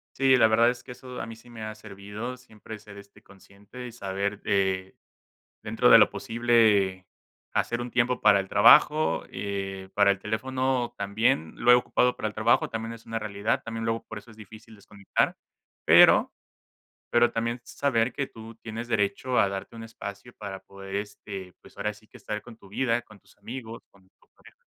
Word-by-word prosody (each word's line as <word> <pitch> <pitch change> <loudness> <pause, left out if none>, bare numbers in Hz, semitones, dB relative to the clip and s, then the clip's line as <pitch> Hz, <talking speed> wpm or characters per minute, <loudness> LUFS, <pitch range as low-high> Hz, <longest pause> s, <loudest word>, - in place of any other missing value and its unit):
Sí, 135 -1 +4
la 115 -3 +6
verdad, 115 +2 +4
es 125 0 -5
que 125 - -11
eso, 125 0 -8
a - - -4
mí 115 0 -9
sí 115 +2 -18
me 115 -2 -9
ha 110 0 -5
servido. 105 +3 -7
Siempre 110 -3 -11
ser, 100 -1 -13
este, 100 0 -15
consciente, 100 +6 -13
y - - -9
saber 100 -2 -3
de 95 -2 0 0.7
dentro - - +1
de - - +10
lo - - +5
posible, 110 -5 +2 0.5
hacer 120 0 -1
un 120 0 -5
tiempo 125 0 +1
para 105 -2 +5
el 95 - -7
trabajo, 150 +9 +5
eh, 95 -1 -5
para 100 -1 +5
el 100 - +1
teléfono, 130 +3 -2
también. 100 -6 0
Lo 120 - +3
he - - +10
ocupado 125 0 +2
para 110 - -2
el 105 - -10
trabajo, 110 +2 +2
también 115 0 -5
es 115 0 -12
una 115 0 -3
realidad. 105 0 -2
También 115 -1 -5
luego, 115 0 -2
por 110 - -7
eso 105 +3 -15
es 110 - -16
difícil 110 +1 -13
desconectar, 100 -1 -2 0.5
pero - - +6 0.8
pero 120 0 +4
también 115 +1 -2
saber, 125 -4 0
que 140 - -3
tú 115 -2 -12
tienes 115 +2 -7
derecho 115 +3 0
a 100 - +5
darte 95 +3 -6
un 115 - -8
espacio, 110 0 -9
para 100 -2 -7
poder, 95 0 -9
este, 100 -2 -6
pues, - - -18
ahora 105 - -2
sí 105 +1 -20
que, - - -15
estar 105 0 -5
con 115 +1 -13
tu 100 - -17
vida, 120 +2 0
con 105 -3 -17
tus - - -25
amigos, 115 +1 -8
con 95 -1 -25
tu - - -29
pareja. - - -21
110 Hz, 195 wpm, -26 LUFS, 100-120 Hz, 0.8 s, de